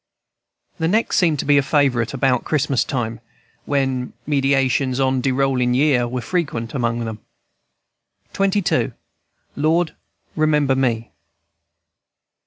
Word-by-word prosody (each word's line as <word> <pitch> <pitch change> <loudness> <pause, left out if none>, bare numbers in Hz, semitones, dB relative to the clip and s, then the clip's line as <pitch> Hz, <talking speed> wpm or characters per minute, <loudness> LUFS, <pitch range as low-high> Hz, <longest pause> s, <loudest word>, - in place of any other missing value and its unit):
The 160 - +1
next 220 +6 +1
seemed 165 -5 +3
to - - -3
be 145 0 +5
a - - +3
favorite 135 -5 +1
about 130 -2 +1
Christmas 140 -4 +1
time, 115 -4 -3 0.5
when 135 -3 -1
meditations 135 -2 +1
on 130 -1 +1
"de 135 - +1
rollin' 130 -2 +1
year" 130 -3 +3
were 125 +1 -3
frequent 120 -6 -3
among 120 -3 -1
them. 110 -1 -6 1.2
XXII. 195 -1 +1 0.6
LORD, 160 +3 +1 0.4
REMEMBER 150 -3 +2
ME. 120 -4 -1
135 Hz, 115 wpm, -20 LUFS, 125-150 Hz, 1.2 s, be